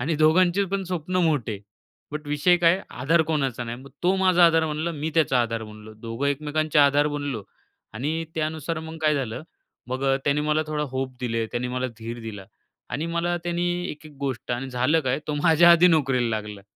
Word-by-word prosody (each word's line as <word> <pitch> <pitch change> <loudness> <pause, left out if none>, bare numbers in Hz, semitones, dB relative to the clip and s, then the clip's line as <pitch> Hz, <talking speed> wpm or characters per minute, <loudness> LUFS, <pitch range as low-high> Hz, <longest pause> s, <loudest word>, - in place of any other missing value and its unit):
आणि 155 +6 0
दोघांचे 175 +5 +4
पण 195 0 0
स्वप्न 180 0 -3
मोठे. 120 -9 -1 0.5
बट 150 0 -5
विषय 150 +5 +3
काय 170 +3 +5 0.2
आधार 165 +5 +4
कोणाचा 135 -6 -1
नाही, 115 0 -5
मग 140 - -13
तो 180 +2 +3
माझा 185 -2 +5
आधार 165 -1 +3
बनला 155 +2 -2
मी 155 0 -3
त्याचा 150 -6 +3
आधार 115 -1 -3
बनलो. 105 0 -12
दोघं 115 +5 -4
एकमेकांचे 150 +2 0
आधार 145 0 +5
बनलो 145 -7 -3 0.5
आणि 155 +8 -2
त्यानुसार 160 +1 -2
मग 160 0 -8
काय 155 -1 +3
झालं. 130 -4 -3 0.5
मग 130 +2 -3 0.2
त्याने 145 +1 +2
मला 150 +1 +1
थोडा 155 -1 -2
होप 130 0 -4
दिले. 115 -2 -1
त्याने 120 +1 -2
मला 125 +1 -2
धीर 115 +1 -6
दिला 105 -4 -8 0.4
आणि 150 +7 -2
मला 175 +1 0
त्यानी 175 0 -1 0.2
एक-एक 150 0 -11
गोष्ट 135 -4 -4
आणि 130 +2 -3
झालं 130 +6 +2
काय 130 -3 0
तो 150 - -2
माझ्या 170 +1 +6
आधी 170 +1 +6
नोकरीला 135 -7 +2
लागला. 105 -2 -7
150 Hz, 185 wpm, -24 LUFS, 125-160 Hz, 0.5 s, माझ्या